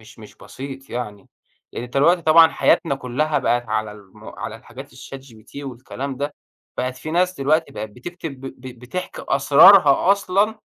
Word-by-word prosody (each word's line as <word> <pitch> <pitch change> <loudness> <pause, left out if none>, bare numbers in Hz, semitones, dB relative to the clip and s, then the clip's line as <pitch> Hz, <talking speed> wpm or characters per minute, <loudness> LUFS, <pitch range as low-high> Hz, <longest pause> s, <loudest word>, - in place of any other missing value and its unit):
مش 110 +1 -17
مش 105 - -14
بسيط 135 0 -10
يعني، 105 -5 -6 0.4
يعني 120 - -6
دلوقتي 165 +7 +2
طبعًا 160 +1 +7
حياتنا 165 -2 +1
كلّها 135 +4 -1
بقِت 120 -2 -1
على 110 -1 -2
الم 105 +1 -17
على - - -7
الحاجات - - -13
الChatGPT 130 -3 -13
والكلام 130 +1 -7
ده، 145 +2 -4 0.4
بقِت 130 0 -2
في 155 - -7
ناس 180 +2 +1
دلوقتي 155 +4 +1
بقِت 105 0 -6
بتكتب 140 - -9
ب 135 - -8
ب 130 -2 -10
بتحكي 180 +9 -6
أسرارها 150 +5 +6
أصلًا 200 +2 0
135 Hz, 155 wpm, -21 LUFS, 120-160 Hz, 0.4 s, طبعًا